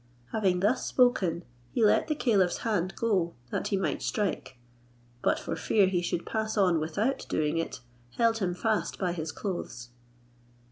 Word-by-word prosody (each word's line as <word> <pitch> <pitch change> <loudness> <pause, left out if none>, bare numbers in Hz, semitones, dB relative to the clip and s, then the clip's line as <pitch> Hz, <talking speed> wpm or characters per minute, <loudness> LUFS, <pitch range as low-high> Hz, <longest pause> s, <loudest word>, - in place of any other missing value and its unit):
Having 190 -5 +1
thus 215 +6 +2
spoken, 185 -10 +2 0.2
he 225 - +2
let 210 - +4
the 305 - 0
caliph's 200 -10 +2
hand 190 -5 0
go, 190 -7 0 0.2
that - - -1
he 200 - 0
might 190 - -1
strike, 200 - -2 0.6
but - - +2
for - - -4
fear 200 +5 +3
he 185 -2 +1
should 175 0 -2
pass 220 0 -2
on 180 -5 +4
without 210 +13 -1
doing 155 +1 0
it, 165 - -4 0.4
held 230 -1 +3
him 180 -3 -1
fast 220 +2 -1
by 180 -3 -1
his 160 -2 -4
clothes. 140 - -5
190 Hz, 160 wpm, -29 LUFS, 170-220 Hz, 0.6 s, let